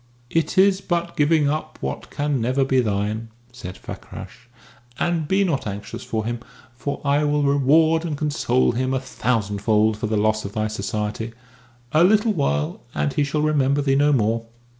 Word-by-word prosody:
"It 165 +2 0
is 195 0 +5
but 175 -2 -2
giving 150 0 +3
up 155 +1 -3
what - - -5
can 145 -3 -1
never 130 +4 +1
be 130 -1 +2
thine," 105 0 -1 0.2
said 95 -7 -8
Fakrash. - - -10 0.5
"And 170 -1 0
be 195 +3 +3
not 155 - -1
anxious 100 0 -6
for 110 -1 -3
him, 120 +1 -2 0.3
for 140 +4 -4
I 145 +1 +3
will 150 0 +1
reward 155 +4 +4
and 155 -4 -3
console 145 -4 +1
him 130 +2 -1
a - - +1
thousandfold 110 -3 0
for 110 - -2
the 110 0 0
loss 110 +1 +1
of 100 - -6
thy 110 -1 -1
society. 105 +2 -3 0.6
A 155 +2 +5
little 215 +3 +4
while, 75 - -1
and 75 -1 0
he 145 - +1
shall 150 +1 -1
remember 145 -2 +2
thee 135 -1 +2
no 145 +2 +4
more." 115 -3 +1
135 Hz, 175 wpm, -22 LUFS, 110-155 Hz, 0.6 s, is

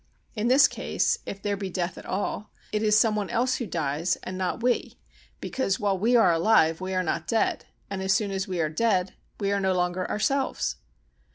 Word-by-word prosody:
In 215 +1 -1
this 270 +3 +6
case, - - -1
if 195 0 -6
there 205 -1 0
be 195 -1 -5
death 180 -1 -3
at - - -11
all, 205 +2 -3 0.2
it 210 - 0
is 215 -1 +4
some 220 -1 +3
one 205 -2 -2
else 250 +2 +1
who 240 - -4
dies 160 0 -1
and 185 - -5
not 185 +5 -2
we, 245 0 0 0.4
because 195 -8 -1
while 200 -2 +1
we 225 +6 +2
are 205 -7 +6
alive 165 -2 +3
we 185 0 -3
are 185 - +1
not - - -2
dead, 225 -1 0 0.2
and 195 -1 -4
as 190 0 0
soon 205 -1 +1
as 190 0 -2
we 185 -2 -3
are 160 - +2
dead 185 +2 0 0.3
we 200 -1 0
are 200 - +1
no 190 -1 +1
longer 180 0 -1
ourselves. 270 +6 0
195 Hz, 210 wpm, -26 LUFS, 185-220 Hz, 0.4 s, this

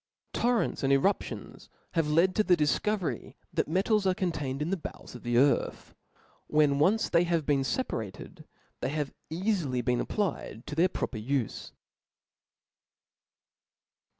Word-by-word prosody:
Torrents 240 -1 +1
and 135 - +2
eruptions 140 +9 0
* - - -40
have 165 -3 +1
made 170 +5 +4
the 185 -4 +3
difco 170 +8 +2
very 180 -5 -5 0.2
that - - +1
metals 195 +5 +2
are 185 - +3
contained 150 -8 -2
in 150 +4 -2
the - - +2
bowels 170 - -9
of 125 - -9
the 120 -1 0
earth. 140 +3 +2 0.5
When 150 -2 +3
once 205 +9 +3
they 170 0 +3
have 170 -3 0
been 145 -2 +3
feparated, 115 - -4 0.4
$hey - - 0
have 150 -1 -2 0.2
eafily 165 - 0
been 125 -1 +2
applied 180 - -3
to - - -6
their 170 +5 +3
proper 120 - -3
ufe. 125 0 -2
155 Hz, 145 wpm, -29 LUFS, 135-185 Hz, 0.5 s, made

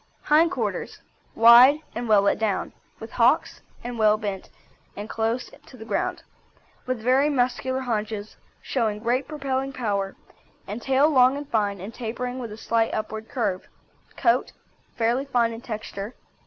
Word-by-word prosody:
HIND 315 +3 +4
QUARTERS 370 - -3 0.4
Wide 245 +6 +8
and 235 0 -4
well 205 -2 +5
let 200 - +2
down, 215 -3 -1 0.3
with - - -9
hocks - - +2 0.2
well 220 -3 +2
bent 200 -3 -5 0.5
and 205 +1 -5
close 225 +3 -2 0.2
to 255 - -14
the 220 - -10
ground, - - -2 0.6
with 255 -2 -1
very 265 +4 +3
muscular 260 -1 0
haunches, 215 -3 -3 0.3
showing 225 -5 -1
great 250 +3 0
propelling 275 -3 -3
power, 200 -6 -2 0.5
and 210 +4 -6
tail 270 +3 +3
long 260 -2 +4
and 290 0 -7
fine 205 -3 0
and 200 +5 -8
tapering 245 +2 -4
with 235 -4 -6
a 210 - -8
slight 225 0 0
upward 220 0 -5
curve. 205 -8 -2 0.5
COAT 240 -1 +1 0.4
Fairly 240 +4 +1
fine 240 -4 +1
in 225 - -8
texture. 215 -2 -6
235 Hz, 150 wpm, -24 LUFS, 215-260 Hz, 0.6 s, Wide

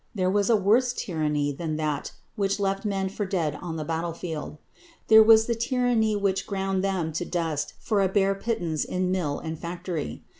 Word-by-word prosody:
There 185 -2 +1
was 205 +1 +1
a 230 - +6
worse 225 +5 +3
tyranny 150 -8 -1
than 155 +2 -4
that 150 -2 -2 0.2
which 195 0 0
left 195 +1 -1
men 195 -2 0
for 200 +2 -4
dead 175 -6 -1
on 170 -2 -5
the 155 - -3
battle 165 +1 -2
field. 160 -3 -6 0.5
There 220 0 +9
was 220 0 +7
the 235 - 0
tyranny 235 -2 +1
which 200 -2 0
ground 195 -2 -1
them 185 -5 -1
to 160 - -2
dust 165 -4 -2
for 210 -3 0
a 190 - +2
bare 195 0 +2
pittance 195 -7 -2
in 180 0 -1
mill 165 -6 -1
and 160 -1 -6
factory. 170 -2 -5
190 Hz, 190 wpm, -26 LUFS, 160-205 Hz, 0.5 s, There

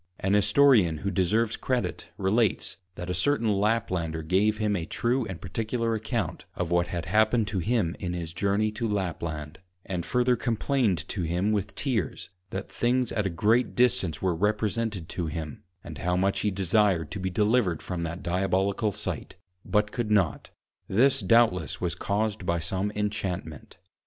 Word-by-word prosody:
An 95 +1 0
Historian 105 - +5
who 100 +6 -3
deserves 105 +5 +1
Credit, 125 -2 -2
relates, 100 +1 +1 0.2
that 90 0 -5
a - - 0
certain 115 +5 +1
Laplander 95 -6 0
gave 100 +6 +2
him 105 -1 0
a 85 -3 -3
true 120 0 0
and 95 -4 -6
particular 115 +4 -2
Account 110 - -3
of 90 -1 -3
what 85 0 +2
had 85 -2 -4
happened 110 +3 +3
to 100 -2 -1
him 100 -3 0
in 90 -1 -3
his 85 -2 -5
Journey 100 +3 +1
to 115 +2 -3
Lapland; 85 -6 -3 0.3
and 90 -2 -3
further 125 +3 +2
complained 115 - 0
to 100 - -3
him 90 +5 0
with 100 -1 -2
Tears, 115 - -2 0.2
that 95 - -5
things 125 0 +1
at 95 -5 -1
great 115 +7 +2
distance 95 -11 +2
were 95 -2 +2
represented 105 0 -1
to 85 -3 -3
him, 80 +1 -5 0.2
and 80 -5 -8
how 90 +6 0
much 95 +2 +1
he 105 - +1
desired 95 -3 +1
to - - -4
be 95 0 -1
Delivered 105 -3 +1
from 90 -2 -4
that 85 +2 -4
Diabolical 95 +4 +1
Sight, 95 -5 -5 0.3
but 105 0 +1
could 120 -3 -2
not; 100 -7 +1 0.4
this 130 +7 +3
doubtless 95 -5 +3
was 90 -1 -1
caused 100 +3 -1
by 85 -1 0
some 95 +4 -2
Inchantment. 95 -7 -4
100 Hz, 165 wpm, -27 LUFS, 90-110 Hz, 0.4 s, Historian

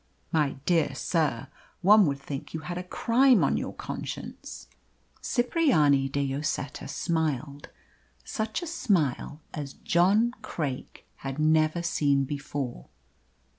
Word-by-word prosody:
"My 150 -4 +2
dear 160 -6 +2
sir, 140 -5 0 0.4
one 205 0 +7
would 140 -1 -1
think 140 +2 -6
you 160 - -3
had 175 +3 -4
a - - -5
crime 240 +6 +4
on - - +2
your - - -2
conscience." - - -7 0.5
Cipriani 240 - +3
de 140 +1 -1
Lloseta 140 0 -3
smiled 150 -4 -2 0.5
such 220 +9 -3
a - - -3
smile 175 - 0
as 145 -3 -5
John 200 +7 +3
Craik 150 - -5
had 135 0 -5
never 155 +2 +2
seen 140 -4 +2
before. 140 - -5
155 Hz, 120 wpm, -27 LUFS, 140-185 Hz, 0.5 s, one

